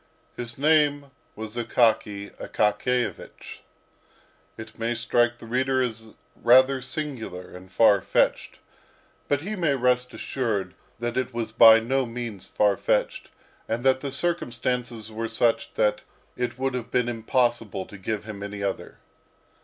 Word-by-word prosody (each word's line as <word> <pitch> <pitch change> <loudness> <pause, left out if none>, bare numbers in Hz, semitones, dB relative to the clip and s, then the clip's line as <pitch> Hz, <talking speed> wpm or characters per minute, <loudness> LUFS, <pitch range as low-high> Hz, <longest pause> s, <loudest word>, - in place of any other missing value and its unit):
His 120 -1 -5
name 145 -1 +2 0.2
was 110 0 -7
Akaky 110 -4 +1
Akakiyevich. 120 +4 -2 1.0
It 110 0 -11
may 115 +1 -1
strike 120 +1 +1
the 115 - -12
reader 130 +3 0
as 110 -2 -6 0.2
rather 130 +2 +5
singular 120 -14 -5
and 90 +1 -12
far 100 -2 +5
fetched; - - 0 0.7
but 145 -1 +1
he 205 +6 -4
may 170 -7 +1
rest 125 0 +1
assured 115 -9 -3 0.2
that 120 +2 -3
it 130 -1 -2
was 115 -2 -3
by 115 0 +8
no 130 +3 0
means 115 -5 -6
far 105 -2 +2
fetched, - - -1 0.4
and 115 +2 -2
that 130 0 +4
the 140 0 -5
circumstances 125 -7 -2
were 115 +1 -4
such 115 +1 +1
that 105 0 +1 0.3
it 125 0 -3
would 135 0 -1
have 125 -2 -4
been 125 -1 +1
impossible 115 -4 0
to - - -13
give 100 +2 -4
him 105 -2 -8
any 100 0 -5
other. 100 -1 -4
120 Hz, 140 wpm, -25 LUFS, 110-130 Hz, 1.0 s, by